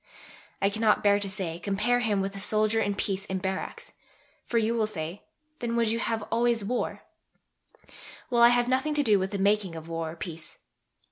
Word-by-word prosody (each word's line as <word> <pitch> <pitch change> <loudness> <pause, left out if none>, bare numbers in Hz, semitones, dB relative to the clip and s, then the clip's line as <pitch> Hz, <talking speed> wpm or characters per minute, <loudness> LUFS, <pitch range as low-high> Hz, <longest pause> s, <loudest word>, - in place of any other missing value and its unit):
I 200 - +3
cannot 215 0 +2
bear 205 0 +4
to 200 -1 -4
say: 185 -4 -3
Compare 205 +6 +1
him 210 -5 +1
with 195 +1 -3
the 200 - -7
soldier 215 +2 +2
in 205 -2 0
peace 195 -1 -2
in 190 - -3
barracks; 190 0 -5 0.5
for 235 - 0
you 225 0 +2
will 225 -2 +1
say, 175 -1 -6 0.4
Then 235 -1 -2
would 230 -2 +2
you 230 +1 -1 0.3
always 235 0 +2
have 200 - -5
war? 250 - -2 1.3
Well, 240 -1 +3
I 235 - +9
have 245 0 +2
nothing 265 +4 +1
to 295 - +2
do 210 -6 +4
with 190 +1 -1
the 200 - -3
making 200 -2 +1
of 160 0 -8
war 165 -1 -3
or 160 - -8
peace. 165 -1 -8
205 Hz, 200 wpm, -27 LUFS, 190-230 Hz, 1.3 s, I